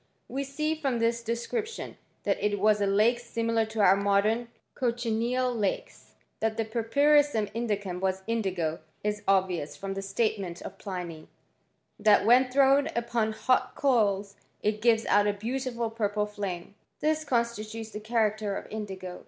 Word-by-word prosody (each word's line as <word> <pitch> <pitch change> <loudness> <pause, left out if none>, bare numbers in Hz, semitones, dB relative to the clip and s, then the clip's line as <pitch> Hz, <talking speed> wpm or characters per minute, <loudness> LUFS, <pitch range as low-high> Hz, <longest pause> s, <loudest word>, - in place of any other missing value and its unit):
We 275 +2 -3
see, 305 +3 -1
from 280 -6 -1
this 230 0 +1
description, 420 - -3 0.3
that - - 0
it 205 -1 +1
was^ 210 +1 +4 0.2
lake 235 +4 +4
similar 230 -1 0
to 220 -1 -2
our 195 -1 +7
modem 205 +4 +2 0.3
cochineal 240 +1 0
lakes.* 210 -5 -2
tr - - -28 0.3
That 220 0 -1
the 225 - 0
purpurissum 240 +1 +2
indicum 205 -5 -2
was 190 0 -1
indigo 185 -8 -1 0.2
is 210 0 -1
ok 190 -1 +4
vious 145 -1 -6
from 195 0 -4
the 195 - -4
statement 195 -3 -1
of 195 - -9
Pliny, 175 -5 -6 0.7
that 210 -1 +5
when 245 +3 +6
thiuwj 275 +3 +3
upon 230 -2 0
hot 255 +3 +1
coals 205 -7 +1 0.3
it 210 0 0
gives 230 -1 +3
out 205 0 +4
a 205 - +2
beautiful 235 +1 -3
purple 210 -2 0
flanMi 200 -3 -5 0.3
This 310 0 +1
constitutes 225 -4 -2
the 210 - -6
character 215 -2 0
of - - -7
indigo. 190 -4 -6
220 Hz, 155 wpm, -28 LUFS, 200-240 Hz, 0.7 s, our